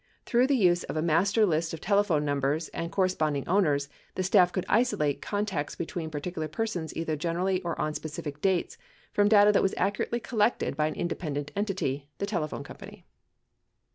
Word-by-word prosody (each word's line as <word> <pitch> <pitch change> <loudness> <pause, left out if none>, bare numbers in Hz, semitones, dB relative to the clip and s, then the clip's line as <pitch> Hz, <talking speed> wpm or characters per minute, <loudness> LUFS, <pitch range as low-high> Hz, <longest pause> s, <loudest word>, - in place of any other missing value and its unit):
Through 245 +2 +3
the 280 -1 +3
use 175 -5 +4
of - - -4
a - - +1
master 195 +7 +3
list 165 -2 0
of - - -10
telephone 200 -6 +2
numbers 145 +2 0
and 170 0 -5
corresponding 155 -7 0
owners, 150 -7 +2 0.3
the 185 - -1
staff 185 -1 +4
could 185 0 -2
isolate 210 - +1
contacts 205 -8 -2
between 170 -1 -4
particular 155 +1 -4
persons 175 -1 -3
either 160 -1 -1
generally 175 +4 -1
or 170 -2 -4
on 155 0 -1
specific 150 -1 -6
dates 190 -3 0 0.3
from 205 0 +4
data 210 -1 +7
that 210 - +3
was 195 - +1
accurately 205 +4 0
collected 225 - 0
by 155 +1 +1
an 155 - -4
independent 145 -4 -3
entity, 190 -9 -2
the 200 - -2
telephone 175 -7 -3
company. - - -12
175 Hz, 170 wpm, -28 LUFS, 155-200 Hz, 0.3 s, data